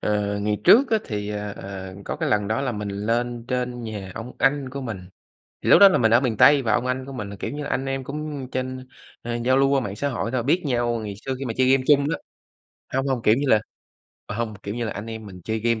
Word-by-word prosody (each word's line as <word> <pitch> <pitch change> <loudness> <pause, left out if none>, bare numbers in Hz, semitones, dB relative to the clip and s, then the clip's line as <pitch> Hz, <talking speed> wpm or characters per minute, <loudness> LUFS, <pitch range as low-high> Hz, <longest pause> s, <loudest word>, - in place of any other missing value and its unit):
ờ, 105 -1 0
ngày 105 0 0
trước 260 +3 +7
á 220 - +4
thì, 105 -2 -4
ờ, 105 -1 -4
ờ, 95 -1 -7
có - - -4
cái - - -1
lần 105 -1 +1
đó 110 - 0
là 130 -3 -1
mình 105 -2 -4
lên 115 +4 -2
trên 125 -1 -2
nhà 100 -4 -6
ông 115 +2 -7
anh 135 0 +2
của 140 +1 -5
mình. 115 -7 -4 0.6
Thì - - -1
lúc - - +8
đó 200 -1 +10
là - - +2
mình 115 -2 +3
ở 120 - +7
miền 115 -5 -1
Tây 145 -1 +7
và 110 -3 +1
ông 125 - +1
anh 130 +1 -2
của 135 - -8
mình 105 -5 -5
là, 100 - -7
kiểu - - -5
như 145 0 -5
là, - - -5
anh 135 - -1
em 135 0 -2
cũng 145 -1 -5
trên 130 0 -4 0.3
ờ, 120 0 -3
giao 130 +1 +4
lưu 135 0 +4
qua 140 -1 +3
mạng 105 -5 -4
xã 140 +6 -1
hội 115 -2 -3
thôi, 125 -3 0
biết 170 +7 +2
nhau 120 -3 0
ngày 105 -2 -5
xưa 135 -1 -1
khi 135 - -4
mà 115 - -2
chơi 130 0 +4
game 135 -1 +3
chung 140 -1 +5
á - - -1 0.8
hông, 135 +1 +1
hông, 130 -3 -1
kiểu 110 - +5
như 140 +3 -1
là 110 - +5 0.7
ờ, 105 - -5
hông, 115 -2 -2
kiểu 100 +2 -4
như 120 -1 -2
là 110 - -3
anh 105 +2 -6
em 110 -1 -7
mình 90 -2 -10
chơi 110 0 -1
game 115 0 0
120 Hz, 280 wpm, -24 LUFS, 105-135 Hz, 0.8 s, đó